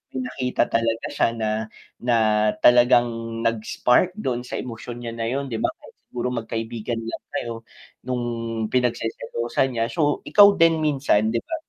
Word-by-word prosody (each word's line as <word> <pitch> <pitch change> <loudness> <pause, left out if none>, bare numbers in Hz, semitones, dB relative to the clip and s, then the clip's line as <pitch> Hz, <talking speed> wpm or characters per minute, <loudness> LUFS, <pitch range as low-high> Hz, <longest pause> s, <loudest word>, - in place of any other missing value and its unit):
may 130 - -2
nakita 125 0 -1
talaga 115 0 0
siya - - +2
na 110 -1 -1 0.5
na 120 -1 +1 0.5
talagang 120 0 +6 0.4
nag-spark 120 - +1
dun 130 - -2
sa - - -5
emosyon 120 0 -6
niya 115 - -4
na 115 0 -3
yun 135 +1 -3
'di 115 - -2
ba - - +1
kahit - - -17
siguro 125 0 -3
magkaibigan 115 0 -4
lang 115 - -6
kayo 120 -1 -3 0.5
nung 125 -1 -1 0.5
pinagseselosan 135 - -1
niya, 115 - +2
so 150 -4 +1
ikaw 205 -1 +8
din 165 -1 +4
minsan, 135 -8 +2
'di 115 - +1
ba? 325 - -4
120 Hz, 155 wpm, -23 LUFS, 115-135 Hz, 0.5 s, ikaw